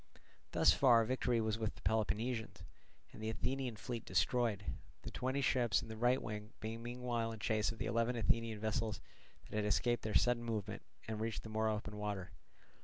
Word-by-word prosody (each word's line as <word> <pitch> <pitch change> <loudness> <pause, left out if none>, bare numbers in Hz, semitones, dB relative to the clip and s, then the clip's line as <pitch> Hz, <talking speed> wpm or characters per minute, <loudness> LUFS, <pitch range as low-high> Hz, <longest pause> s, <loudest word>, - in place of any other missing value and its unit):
Thus - - +6
far 120 -4 +6
victory 125 -1 +1
was 110 0 0
with 110 -2 -1
the - - -15
Peloponnesians, 110 +1 0 0.5
and - - -10
the 110 - -1
Athenian 125 +2 -1
fleet 120 +1 -4
destroyed; 105 +3 +1 0.4
the - - -6
twenty 130 +2 -1
ships 120 -4 +3
in 115 - -8
the 110 - -5
right 120 +3 +3
wing 105 +1 -6
being 110 +1 -4
meanwhile 120 -1 -2
in 110 - -6
chase 110 0 +1
of 115 - -9
the - - -2
eleven 115 +2 +1
Athenian 115 -1 +1
vessels 110 0 -1 0.5
that - - -5
had 105 - +1
escaped 120 +3 +2
their 110 -3 -3
sudden 120 +5 +4
movement 110 -4 -3 0.3
and 110 -1 -3
reached 115 0 -2
the 110 - -7
more 110 0 +1
open 105 -1 -3
water. 100 -3 -3
110 Hz, 185 wpm, -37 LUFS, 110-120 Hz, 0.5 s, Thus